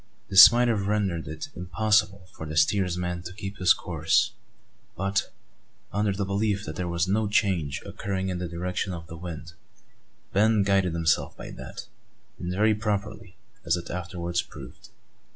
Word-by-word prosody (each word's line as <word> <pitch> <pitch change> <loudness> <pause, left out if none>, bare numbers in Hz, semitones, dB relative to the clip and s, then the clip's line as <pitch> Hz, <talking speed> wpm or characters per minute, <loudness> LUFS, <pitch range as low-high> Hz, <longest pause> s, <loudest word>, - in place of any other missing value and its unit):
This 100 +1 +11
might 120 +1 +2
have 105 -4 0
rendered 100 -6 -1
it 80 0 -6
impossible 100 +1 +1
for 80 - -8
the 80 +1 -5
steersman 90 +1 +1
to 85 +1 -8
keep 100 0 -7
his 90 0 +5
course; 85 +7 +2 0.6
but, 100 +1 -1 0.6
under 105 0 +1
the 100 +1 -2
belief 100 +1 -1
that 80 - -6
there 90 +2 -3
was 85 +1 0
no 105 +3 +1
change 95 -8 0
occurring 95 -1 -3
in 90 -1 -3
the 90 - -3
direction 90 +2 -3
of 85 -1 -7
the 80 - -10
wind, 85 -1 -8 0.8
Ben 110 +1 +4
guided 95 -3 +2
himself 80 -1 +1
by - - -8
that, - - -8 0.5
and 90 - -4
very 105 +4 +3
properly, 105 -2 -3 0.3
as 85 0 +2
it 85 - -7
afterwards 85 -1 -2
proved. - - -12
95 Hz, 160 wpm, -26 LUFS, 85-100 Hz, 0.8 s, This